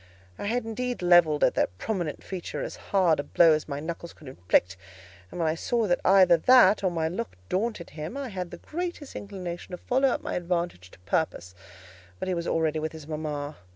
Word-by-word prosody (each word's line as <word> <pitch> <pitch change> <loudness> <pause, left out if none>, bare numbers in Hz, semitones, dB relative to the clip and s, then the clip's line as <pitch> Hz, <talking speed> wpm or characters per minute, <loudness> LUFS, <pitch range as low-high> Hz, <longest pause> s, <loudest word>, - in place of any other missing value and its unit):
I - - -4
had 240 +2 -1
indeed 245 -1 -3
levelled 175 -4 +5
at - - +4
that 90 - -1
prominent 175 - -3
feature 185 -3 -5
as - - -5
hard 185 -6 +3
a - - -1
blow 165 +2 +5
as 155 - -1
my 140 0 -3
knuckles 170 +2 -6
could 150 - -15
inflict; 90 -5 +1 0.5
and - - -8
when 165 - +1
I 155 - +2
saw 230 +7 0
that 175 -3 +1
either 185 -3 +6
that 245 +2 +6
or 190 - +3
my 165 -2 -1
look 210 +8 -4
daunted 205 -3 -2
him, 155 - -6
I 275 -2 -4
had 185 -4 -5
the - - -9
greatest 345 -3 -5
inclination 185 -3 -6
to - - -3
follow 260 +8 +1
up 265 +3 0
my 305 - -4
advantage 170 - -2
to - - -18
purpose; 95 - -2 0.6
but - - -4
he 185 - 0
was 170 -1 -3
already 160 -1 +1
with 155 +1 -3
his 160 -2 -9
mama. 150 -1 -4
175 Hz, 210 wpm, -27 LUFS, 155-205 Hz, 0.6 s, either